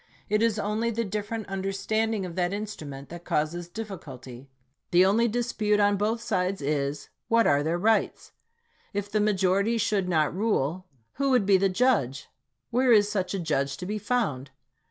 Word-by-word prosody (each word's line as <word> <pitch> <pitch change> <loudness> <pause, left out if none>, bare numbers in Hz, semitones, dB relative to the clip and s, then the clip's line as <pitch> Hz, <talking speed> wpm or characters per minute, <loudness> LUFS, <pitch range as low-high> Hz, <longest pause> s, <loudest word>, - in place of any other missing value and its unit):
It 210 +1 +2
is 230 -2 +2
only 215 +3 -1
the 230 0 -1
different 210 +1 -4
under 195 0 -3
standing 215 +1 -1
of 175 - -6
that 180 0 0
instrument 150 -10 -6
that 175 0 -9
causes 170 +3 -2
difficulty. 140 - -8 0.4
The 180 +1 +5
only 225 +5 +3
dispute 220 -3 0
on 205 0 +4
both 215 +3 -1
sides 195 -4 -1
is, 140 0 -2 0.2
"What 230 0 +4
are 140 0 +4
their 160 +3 0
rights?" 220 +5 +1 0.6
If 205 0 -3
the 215 - +1
majority 200 +2 +2
should 200 -4 0
not 155 -4 +2
rule, 185 -4 -1 0.3
who 275 0 +1
would 250 -6 +3
be 195 -1 +5
the 195 +1 +2
judge? 185 - +1 0.4
Where 250 +1 +3
is 205 -2 +5
such 190 -2 -1
a - - -2
judge 140 -5 -1
to 180 - -6
be 210 +3 -3
found? 185 - -1
195 Hz, 175 wpm, -27 LUFS, 170-220 Hz, 0.6 s, The